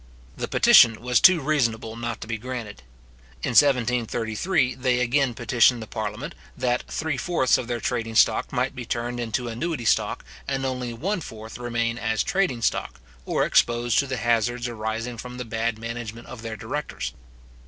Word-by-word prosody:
The - - -4
petition 115 -2 +6
was 125 0 +2
too 185 -4 +7
reasonable 115 -6 0
not 120 0 -4
to - - -7
be 115 -1 -3
granted. 120 - -6 0.6
In - - 0
1733, 125 - +2
they 125 -1 0
again 125 0 +1
petitioned 120 +1 +3
the 110 - -6
parliament, 110 +5 -5 0.2
that 125 -1 0
three 160 -3 -2
fourths 130 -5 +2
of 120 - -2
their 120 -1 -2
trading 115 -2 -2
stock 110 0 +3
might 130 +1 -1
be 125 - -5
turned 120 +1 -3
into 120 +1 -2
annuity 125 +3 -3
stock, - - +1 0.2
and 135 0 -1
only 125 -2 -3
one 180 - -2
fourth 110 -4 -9
remain 115 -1 -1
as 110 -1 0
trading 185 - 0
stock, - - -1 0.3
or - - +1
exposed 120 -1 +3
to 140 - +1
the 130 -1 -3
hazards 120 +1 +1
arising 115 +1 -4
from 125 +1 -8
the 125 - -5
bad 115 0 -2
management 115 0 -6
of 115 - -9
their 115 -1 -6
directors. 110 +8 -4
120 Hz, 170 wpm, -24 LUFS, 115-130 Hz, 0.6 s, too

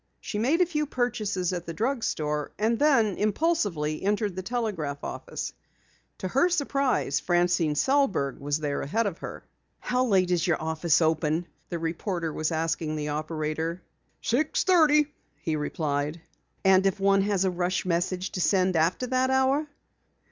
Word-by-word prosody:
She 210 - -4
made 285 +10 +2
a - - +6
few 300 -3 -2
purchases 215 -8 -1
at 175 -1 -5
the 165 - -5
drug 240 - -1
store 150 -1 -2
and 220 +2 +1
then 235 -10 +3
impulsively 205 - 0
entered 205 -1 0
the 185 - -3
telegraph 190 - -3
office. - - -5 0.6
To 185 - -4
her 270 - +3
surprise, 275 - +1
Francine 175 -3 +2
Sellberg 195 - +1
was 145 +1 -1
there 145 -2 -2
ahead 225 +11 0
of 190 -4 -3
her. - - -7 0.4
"How 250 +1 0
late 190 -6 +2
is 175 -1 +1
your 170 - +2
office 160 +1 +1
open?" 160 +1 +1 0.2
the 170 - -2
reporter 165 0 -3
was 155 +1 -1
asking 160 -1 -1
the 150 -1 -3
operator. 155 +2 -3 0.4
"Six 290 +7 +1
thirty," 300 -5 +4 0.3
he 160 - -2
replied. 150 +1 -2 0.5
"And 190 0 +5
if 195 +1 -1
one 195 0 +4
has 195 -1 +1
a 185 - +2
rush 180 +1 -1
message 180 +2 -1
to 185 - -3
send 185 0 +2
after 165 +9 +2
that 255 +1 +1
hour?" 265 +3 +2
185 Hz, 160 wpm, -27 LUFS, 160-235 Hz, 0.6 s, a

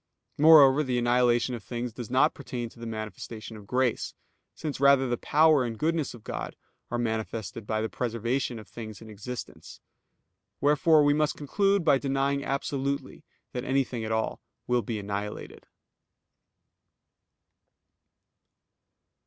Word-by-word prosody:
Moreover, 150 -2 +8
the 130 -4 -1
annihilation 120 0 +2
of 115 -4 -6
things 120 +3 -4
does 120 -2 -7
not 130 - +3
pertain 125 -4 -5
to 115 - -19
the 115 - -6
manifestation 110 +1 -7
of 105 -2 -12
grace; 125 -1 0 0.4
since 150 -4 -5
rather 140 -1 +5
the 120 - 0
power 155 +2 +4
and 115 -2 -4
goodness 160 -3 -1
of 115 - -14
God - - -5 0.3
are 120 - -2
manifested 110 -2 -3
by 110 0 0
the 110 - -1
preservation 120 +2 -2
of 110 - -10
things 110 -3 -8
in 110 -1 -11
existence. 115 +4 -8 0.8
Wherefore 150 +2 +4
we 145 0 +4
must 150 0 0
conclude 195 +5 +1
by 140 -4 +5
denying 140 0 0
absolutely 140 0 -3 0.3
that 125 - -4
anything 130 -3 0
at 110 - -3
all 110 0 -1 0.2
will 125 0 +1
be 115 -1 -4
annihilated. 105 0 -6
125 Hz, 135 wpm, -27 LUFS, 115-140 Hz, 0.8 s, Moreover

